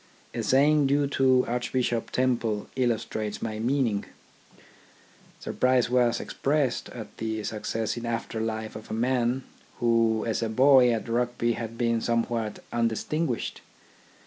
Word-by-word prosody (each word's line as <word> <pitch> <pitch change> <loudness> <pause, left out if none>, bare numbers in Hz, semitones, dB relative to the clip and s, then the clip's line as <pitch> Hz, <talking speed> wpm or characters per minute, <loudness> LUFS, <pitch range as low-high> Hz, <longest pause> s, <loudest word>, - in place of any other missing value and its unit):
A - - -2
saying 145 +2 +4
due 145 +1 +2
to 130 -2 +3
Archbishop 120 -1 -1
Temple 120 -5 0
illustrates 110 -4 -1
my 110 -1 -4
meaning. 120 -3 0 1.3
Surprise 125 -1 +1
was 125 -2 +3
expressed 140 -3 -1
at 115 -4 -9
the 110 -1 -3
success 110 +1 -2
in 120 0 -4
after 115 -1 -3
life 110 -1 -3
of 110 - -9
a 110 - -3
man, 125 +2 +1 0.3
who 115 -2 +2
as 115 0 -1
a 115 - -1
boy 130 +1 +6
at 115 0 -2
Rugby 120 0 0
had 115 0 -6
been 115 -1 +1
somewhat 115 -2 -1
undistinguished. 120 +4 -1
120 Hz, 130 wpm, -27 LUFS, 115-130 Hz, 1.3 s, boy